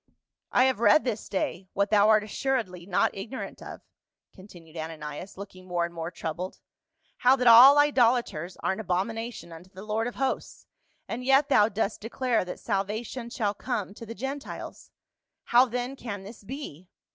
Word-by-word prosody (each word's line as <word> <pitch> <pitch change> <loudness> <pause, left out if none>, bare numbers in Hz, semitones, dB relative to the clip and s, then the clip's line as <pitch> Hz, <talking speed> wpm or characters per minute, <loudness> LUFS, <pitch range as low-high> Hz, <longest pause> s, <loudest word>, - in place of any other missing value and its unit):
" - - -63
I 250 - +4
have 260 -4 +2
read 235 +7 +5
this 225 -4 -3
day, 190 -1 -3
what 200 +1 0
thou 210 0 +5
art 215 -1 +5
assuredly 215 -6 -2
not 185 - +1
ignorant 220 +7 -7
of," - - -9 0.5
continued 175 -4 -15
Ananias, 160 +2 -7
looking 185 -2 -10
more 175 -1 0
and 170 - -8
more 165 0 -4
troubled, 175 +1 -5 0.3
" 320 0 -43
how 255 +2 +5
that 250 -2 -2
all 245 +5 +9
idolaters 240 - +2
are - - +1
an 190 - -4
abomin 195 +5 -1
ation 225 -7 -7
unto 165 +3 -12
the 190 +1 -11
Lord 220 +2 -1
of 245 - -6
Hosts, 270 +1 -3 0.4
and 245 +2 -5
yet 270 +2 +4
thou 210 -6 +5
dost 215 0 -2
declare 235 +2 0
that 180 - -7
salvation 220 +5 -3
shall 210 -4 -1
come 210 -3 -4
to 230 +2 -11
the 230 - -7
Gentiles. 270 +6 -7 0.5
How 245 +2 +5
then 250 +2 -4
can 205 -7 -6
this 210 +2 -12
be 195 - -8
215 Hz, 180 wpm, -27 LUFS, 185-250 Hz, 0.5 s, all